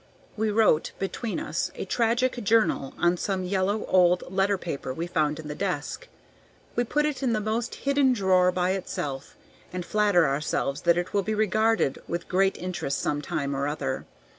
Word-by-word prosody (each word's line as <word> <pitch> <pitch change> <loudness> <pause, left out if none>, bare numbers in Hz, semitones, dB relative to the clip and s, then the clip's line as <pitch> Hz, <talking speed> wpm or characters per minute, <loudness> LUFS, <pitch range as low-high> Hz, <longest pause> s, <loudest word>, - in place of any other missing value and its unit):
We 220 0 0
wrote, 210 -7 +3
between 220 +7 -3
us, 325 - -2
a - - -4
tragic 240 +1 +1
"journal" 215 -10 +2
on 175 +1 +2
some 190 0 -2
yellow 195 +3 0
old 180 -1 +4
letter 195 +1 +2
paper 155 -7 -5
we 165 - -3
found 155 -3 0
in 155 - -7
the 150 - -4
desk. 185 - -3 0.7
We 240 - +2
put 295 +5 +1
it 300 -2 -2
in 250 -4 +1
the 215 - +1
most 220 +3 -2
hidden 275 -1 +2
drawer 185 -5 +3
by 180 0 0
itself, 145 -7 -4 0.4
and 180 -1 -4
flatter 205 -5 +3
ourselves 140 0 -1
that 170 - +6
it 175 0 -2
will 200 - +3
be 215 +3 -2
regarded 215 -6 +2
with 170 0 -4
great 190 +1 +2
interest 175 -6 -3
some 145 0 -1
time 140 -1 -2
or 140 +1 -1
other. 140 -3 -3
185 Hz, 180 wpm, -26 LUFS, 165-220 Hz, 0.7 s, that